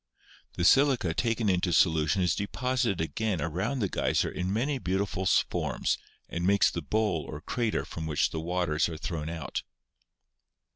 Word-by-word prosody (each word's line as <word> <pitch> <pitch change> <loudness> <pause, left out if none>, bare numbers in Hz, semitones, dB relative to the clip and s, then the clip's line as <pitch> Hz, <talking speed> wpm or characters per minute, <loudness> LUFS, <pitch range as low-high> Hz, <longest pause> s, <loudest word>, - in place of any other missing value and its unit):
The 85 - -1
silica 135 - +4
taken 115 +2 0
into 90 -2 +2
solution 80 +2 +3
is 90 -4 +2
deposited 120 0 -1
again 100 +3 -1
around 95 - -2
the 100 - +2
geyser - - 0
in 90 +1 -2
many 130 +6 0
beautiful 95 -2 -1
forms - - +1 0.3
and 85 - -4
makes 100 +2 +4
the 85 - -3
bowl 100 0 0
or 75 - -6
crater 115 +7 -1
from 80 -1 -6
which 75 -2 +1
the 80 - -3
waters 85 -2 0
are 80 - -6
thrown 80 -1 -4
out. 80 -6 -4
90 Hz, 155 wpm, -28 LUFS, 80-110 Hz, 0.3 s, silica